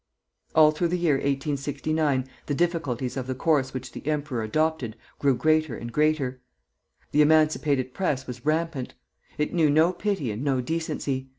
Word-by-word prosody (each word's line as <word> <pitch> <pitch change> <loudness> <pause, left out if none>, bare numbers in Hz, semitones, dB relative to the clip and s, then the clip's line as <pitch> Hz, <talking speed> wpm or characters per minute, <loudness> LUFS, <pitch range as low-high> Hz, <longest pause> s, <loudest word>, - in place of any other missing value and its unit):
All 155 -1 +7
through 165 +3 0
the 180 +2 0
year 165 -5 +2
1869 140 0 -1 0.2
the 145 - 0
difficulties 145 -7 -1
of 130 -2 -4
the 130 - -2
course 135 -2 +1
which 130 - -6
the - - -9
emperor 150 -5 -1
adopted 135 0 -1 0.2
grew 140 -2 +3
greater 155 0 +1
and 120 0 -7
greater. 145 -2 +1 0.7
The 150 - +4
emancipated 150 -4 +3
Press 145 -8 -1
was 125 -2 -8
rampant. 155 -3 -1 0.4
It 150 - -1
knew 165 -4 +3
no 160 +5 +4
pity 190 - -1
and 105 +5 -5
no 135 -3 +1
decency. 140 -2 -3
145 Hz, 160 wpm, -26 LUFS, 130-155 Hz, 0.7 s, All